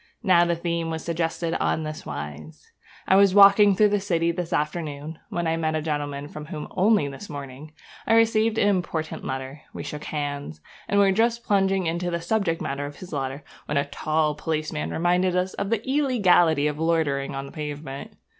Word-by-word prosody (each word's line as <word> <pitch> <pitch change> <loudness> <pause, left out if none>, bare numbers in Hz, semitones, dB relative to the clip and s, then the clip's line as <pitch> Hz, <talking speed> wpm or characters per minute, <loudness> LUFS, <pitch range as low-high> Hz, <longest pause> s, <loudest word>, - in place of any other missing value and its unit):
Now 180 -4 +5
the 170 0 +1
theme 170 -1 -2
was 160 0 -4
suggested 165 0 -1
on 160 - 0
this 155 0 -6
wise. 75 +1 -8 0.4
I 190 - +5
was 195 -1 +5
walking 200 0 +7
through 210 +2 +4
the 205 0 +1
city 170 -4 +1
this 170 0 -4
afternoon, 150 0 -3
when 175 -1 -2
I 165 0 0
met 155 -1 -1
a 155 - 0
gentleman 145 -2 -3
from 150 0 -9
whom, 150 -2 -6
only 200 -6 +3
this 140 +9 -9
morning, 145 +1 -8 0.3
I 225 - +4
received 225 -1 +3
an 205 - +3
important 175 -5 -1
letter. 135 +2 -5
We - - -5
shook 150 0 -6
hands, 145 - -4 0.3
and 200 - +2
were 200 -1 +5
just 230 +3 +1
plunging 195 -2 +2
into 170 +2 -1
the 170 -1 -2
subject 170 -2 -1
matter 140 +1 -3
of 145 - -10
his 185 - -10
letter 135 0 -3 0.2
when 150 - -1
a 140 - +2
tall 155 +1 0
policeman 155 - -3
reminded 180 - +1
us 180 +1 0
of 200 - -3
the 230 +1 -1
illegality 195 - +3
of 150 0 -1
loitering 155 -5 0
on 135 0 -4
the - - -10
pavement. 145 -2 -6
165 Hz, 190 wpm, -25 LUFS, 145-190 Hz, 0.4 s, walking